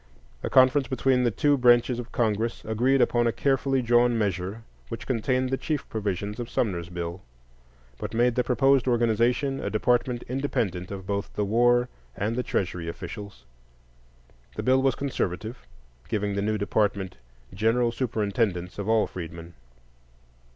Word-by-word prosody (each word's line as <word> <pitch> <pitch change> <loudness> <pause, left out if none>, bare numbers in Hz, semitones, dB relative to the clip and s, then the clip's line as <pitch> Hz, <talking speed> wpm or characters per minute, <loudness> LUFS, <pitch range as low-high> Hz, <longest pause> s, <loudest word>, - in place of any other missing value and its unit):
A - - -3
conference 130 +1 +5
between 130 -1 +2
the - - +4
two 145 +5 +2
branches 120 0 +4
of 120 -1 -7
Congress 115 0 -1
agreed 125 +5 +2
upon 120 0 +2
a - - +2
carefully 135 0 +1
drawn 120 0 +3
measure 100 +1 -2 0.3
which - - -6
contained 130 +1 0
the 135 - +1
chief 150 -3 -2
provisions 105 0 -3
of 120 -1 -5
Sumner's 90 -7 -1
bill, 85 0 -5 0.8
but 105 +1 -5
made 120 +1 +3
the 125 - +1
proposed 135 +1 +3
organization 120 +3 +2
a - - -3
department 120 +2 +1
independent 110 -9 -2
of 95 -2 -7
both 100 +1 -3
the 105 - 0
War 120 +3 +3 0.3
and 110 +3 -1
the 125 - 0
Treasury 90 -7 -2
officials. 90 -5 -8 1.1
The - - -4
bill 130 +1 +4
was 135 -1 +2
conservative, 115 -4 -3 0.4
giving 105 -2 -1
the 100 - -1
new 105 +1 0
department 100 -3 -1 0.4
"general 115 +4 +2
superintendence 105 -6 -1
of 100 +1 -3
all 110 -1 +4
freedmen." 85 -1 -8
115 Hz, 150 wpm, -26 LUFS, 100-125 Hz, 1.1 s, conference